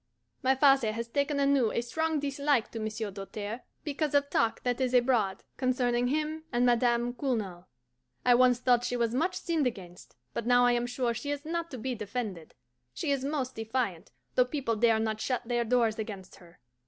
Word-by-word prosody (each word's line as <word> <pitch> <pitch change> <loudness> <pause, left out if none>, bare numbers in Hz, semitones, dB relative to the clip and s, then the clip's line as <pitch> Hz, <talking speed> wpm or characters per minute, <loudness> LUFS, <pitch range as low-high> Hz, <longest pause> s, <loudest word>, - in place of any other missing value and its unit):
My 265 0 +3
father 270 -5 +4
has 230 +1 -4
taken 280 +3 0
anew 275 -5 +3
a - - 0
strong 320 +6 -1
dislike 280 -3 0
to 225 - -5
Monsieur 215 -1 -3
Doltaire, 205 +4 -6 0.2
because 295 0 -1
of 285 0 +2
talk 225 - +1
that 245 +1 -1
is 255 -1 +1
abroad 240 -6 +2
concerning 245 -1 +1
him 310 +3 -1
and 245 +1 +2
Madame 240 0 +2
Cournal. 215 -10 -3 0.6
I 250 - +6
once 250 0 +5
thought 245 -1 +3
she 245 - -1
was 235 -1 0
much 340 +8 0
sinned 325 -6 0
against, 180 -6 -8 0.2
but 235 - -3
now 245 0 +5
I 245 - +5
am 240 0 0
sure 245 -1 -1
she 245 +5 -5
is 290 0 -3
not 335 +1 -3
to 260 - -7
be 255 +2 -3
defended. 205 -6 -5 0.4
She 315 -6 -1
is 275 -2 0
most 275 -3 -2
defiant, 225 -6 -3 0.2
though 250 - +4
people 250 -4 -2
dare 225 0 +4
not 220 -1 -1
shut 250 0 -1
their 240 -1 +1
doors 230 -2 +1
against 200 -4 -7
her. 175 -2 -18
245 Hz, 190 wpm, -29 LUFS, 225-275 Hz, 0.6 s, I